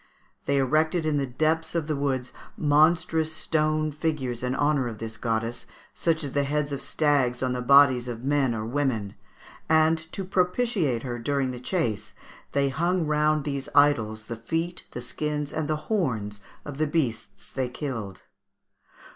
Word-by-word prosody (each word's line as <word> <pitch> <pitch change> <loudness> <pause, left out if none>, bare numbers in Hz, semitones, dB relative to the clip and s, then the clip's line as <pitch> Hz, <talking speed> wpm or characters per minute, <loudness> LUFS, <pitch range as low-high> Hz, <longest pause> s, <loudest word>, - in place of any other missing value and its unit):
They 140 - +1
erected 155 +5 +2
in 155 -2 +1
the 135 - -1
depths 155 +6 0
of 165 -3 0
the 155 0 -1
woods 135 -3 -2 0.2
monstrous 160 +2 +3
stone 155 -1 0
figures 145 -6 -2
in 125 +1 -1
honour 145 -3 +2
of 115 -2 -6
this 110 0 -6
goddess, 115 0 -2 0.3
such 165 -2 0
as 140 - -3
the 140 +1 +1
heads 145 +1 -1
of 140 - -3
stags 135 -5 +1
on 130 -1 0
the 125 - -2
bodies 130 -1 +6
of 120 -1 -5
men 135 -3 +2
or 110 -1 -3
women; 115 -5 -1 0.6
and, 160 0 +4
to 195 - -4
propitiate 180 - +1
her 120 -2 -4
during 135 +1 0
the 125 - -7
chase, 115 - -2 0.4
they 140 -1 +2
hung 170 +5 0
round 150 0 +2
these 140 -2 -3
idols 110 -7 +3
the 115 +1 -6
feet, 165 +9 -3
the 125 - -6
skins, 150 +3 -3
and 155 -2 -2
the 155 - +1
horns 115 - -1 0.2
of 145 -1 -7
the 155 - +2
beasts 120 -10 -2
they 130 -2 -2
killed. 120 -8 -5
140 Hz, 165 wpm, -26 LUFS, 125-155 Hz, 0.6 s, bodies